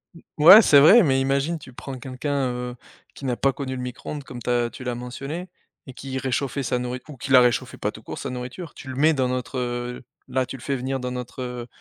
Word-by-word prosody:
M - - -14 0.2
ouais, 200 +7 +11
c'est 145 -8 +6
vrai, 200 +10 +8
mais 135 -3 +2
imagine, 140 +5 0
tu 130 -3 -13
prends 135 +1 -7
quelqu'un, 135 +1 -2
heu, 125 0 -5 0.4
qui 140 - -9
n'a 125 -2 0
pas 135 +1 +1
connu 130 -1 -4
le 125 - -5
micro-ondes 130 +3 -6
comme 125 -3 -9
tu - - -4
as 120 -1 +1
tu 130 - -10
l'as 125 -1 -2
mentionné 135 +9 -6 0.4
et 130 - -10
qui 130 +1 -6
réchauffait 135 +1 -2
sa 125 0 -1
nourri 125 +1 -4
ou 145 -4 -10
qui 135 - -6
la 130 - +9
réchauffait 120 -1 +1
pas - - -2
tout - - -13
court - - -7
sa - - -5
nourriture, 125 +7 -7
tu 135 - -12
le 130 - -5
mets 155 +4 +4
dans 130 -3 +1
notre, 125 +1 -3
heu 120 0 -3 0.2
là, 130 -1 0
tu 135 +1 -7
le - - -15
fais 140 +2 -2
venir 130 +1 -3
dans 125 0 -4
notre, 125 +1 -6
heu, 125 -1 -5
130 Hz, 255 wpm, -24 LUFS, 125-140 Hz, 0.4 s, ouais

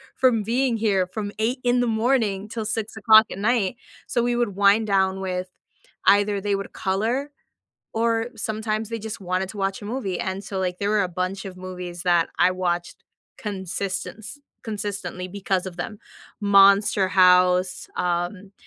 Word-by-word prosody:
from 245 -4 +3
being 235 +3 0
here 200 -4 +2
from 205 -2 -3
8:00 240 +4 0
in 245 0 +3
the 245 - +1 0.2
morning 215 -6 +1
till 220 -1 -4
6:00 220 0 +4
at - - -6
night, 215 0 +1 0.3
so 240 -2 0
we 240 0 +1
would 240 -5 -1
wind 205 +2 +4
down 190 -1 +1
with 185 -1 -3 0.6
either 205 0 +4
they 205 0 0
would 195 0 -6
color 225 +8 -1 0.6
or 230 0 +1
sometimes 220 -1 -3
they 230 0 -4
just 220 0 -6
wanted 185 0 -2
to 210 - -9
watch 195 +1 -2
a - - -8
movie, 210 -5 -3
and 190 +1 -3
so, 195 -1 -4
like, 180 -1 -2
there 200 +2 -1
were 215 -1 +3
a 185 - 0 0.2
bunch 195 +2 -4
of 185 -1 -8
movies 180 -1 -7
that 175 -2 +3
I 185 - +4
watched 175 -1 -2 0.4
consistence 200 - -5 0.3
consistently 205 -4 -4
because 190 -1 -2
of 180 -2 -7
them; 210 +4 -5 0.4
Monster 200 0 +5
House, 180 0 +4
um, 180 +3 -2
200 Hz, 165 wpm, -24 LUFS, 185-220 Hz, 0.6 s, Monster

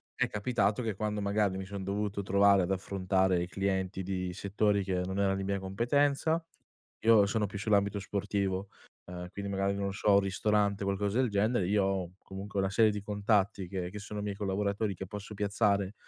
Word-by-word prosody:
è - - +1
capitato 105 0 0
che 110 -4 -2
quando 105 +1 -2
magari 100 -1 +1
mi 95 - -5
son 100 0 -6
dovuto 100 +1 -2
trovare 100 0 +4
ad 90 - -2
affrontare 95 -1 +1
i - - -5
clienti 95 0 -1
di 90 -1 -3
settori 100 +1 +1
che 95 -1 -1
non 95 +1 -3
erano 95 -1 +2
di 95 - -3
mia 100 0 -1
competenza, 140 - +1 0.6
io 110 -3 +7
sono 105 +1 0
più 100 0 -6
sull'ambito 100 0 +2
sportivo, 100 0 -2 0.4
ehm, 90 0 -7
quindi 100 0 -5
magari 100 0 0
non 100 -1 -2
so 100 +1 +2
un 100 - +6
ristorante, 100 +1 +1
qualcosa 100 +3 0
del 130 -2 +2
genere, 105 -1 +1
io 100 +1 +2
ho 95 -3 -1
comunque 100 +1 -7
una 95 0 +1
serie 110 +2 +5
di 105 0 -4
contatti 100 -2 +1
che 90 -1 -4
che 105 - -7
sono 105 0 -6
miei 105 -1 -2
collaboratori 100 +1 -1
che 95 - -6
posso 105 +2 -7
piazzare 100 -1 +1
100 Hz, 190 wpm, -31 LUFS, 95-105 Hz, 0.6 s, io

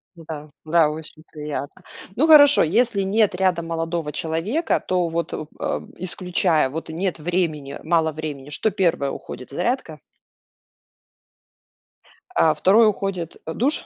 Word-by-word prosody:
Да, 155 -2 -8 0.2
да, 160 -1 +3
очень 155 0 -9
приятно. 150 -2 -6 0.3
Ну, 310 +6 +3
хорошо, 290 -2 +8
если 200 +4 +2
нет 205 +1 +2
рядом 180 -3 +1
молодого 165 -2 -2
человека, 165 - -1
то 180 -2 +1
вот, 165 0 -3
э, - - -2 0.6
исключая, 175 -4 0
вот 160 +3 -6
нет 175 +2 -2
времени, 155 -4 -2
мало 160 -1 +2
времени, 145 -3 -6
что 220 +8 0
1 170 -7 +1
уходит, 125 -1 -8
зарядка? 175 - -2 2.4
Э, 155 -1 +4
2 210 +8 +5
уходит, 195 -5 -2
а, 160 - -4
душ? 280 +6 0
170 Hz, 125 wpm, -22 LUFS, 155-190 Hz, 2.4 s, хорошо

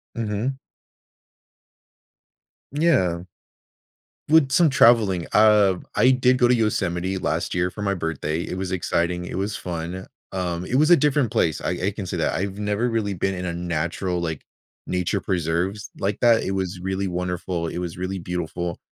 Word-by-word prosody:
Mhm. 115 +4 -2 2.1
Yeah. 95 - +2 1.1
With 155 -4 +5
some 165 +2 +5
traveling, 110 -9 +4
uh, 105 -3 +5 0.2
I 130 - +5
did 125 0 +3
go 120 - +4
to 125 - +4
Yosemite 95 -4 0
last - - -2
year 90 +1 +1
for 105 - -8
my 100 -1 0
birthday. 80 -1 -2
It - - -5
was 95 -1 -3
exciting, 90 0 -1
it - - -5
was 100 +1 -2
fun. 90 +1 -5 0.3
Um, 90 -2 -2
it 125 - -2
was 155 +4 +4
a - - +10
different 145 -6 +2
place. 80 -3 +1
I - - -2 0.2
I - - +1
can 100 -1 -6
say - - -4
that. - - 0
I've 95 +4 -3
never 105 +3 0
really 105 -3 -1
been 95 +2 -1
in 90 0 -4
a 85 - -2
natural, 85 +1 -2
like, 80 -3 -4 0.4
nature 90 +2 0
preserves 90 +3 -2
like 100 +1 -1
that. 120 -2 +5
It 95 - -2
was 95 -1 -3
really 95 +1 -2
wonderful. 90 -1 -3
It 85 - -4
was 85 -2 -5
really 95 +1 -3
beautiful. 85 0 -4
95 Hz, 170 wpm, -23 LUFS, 90-105 Hz, 2.1 s, a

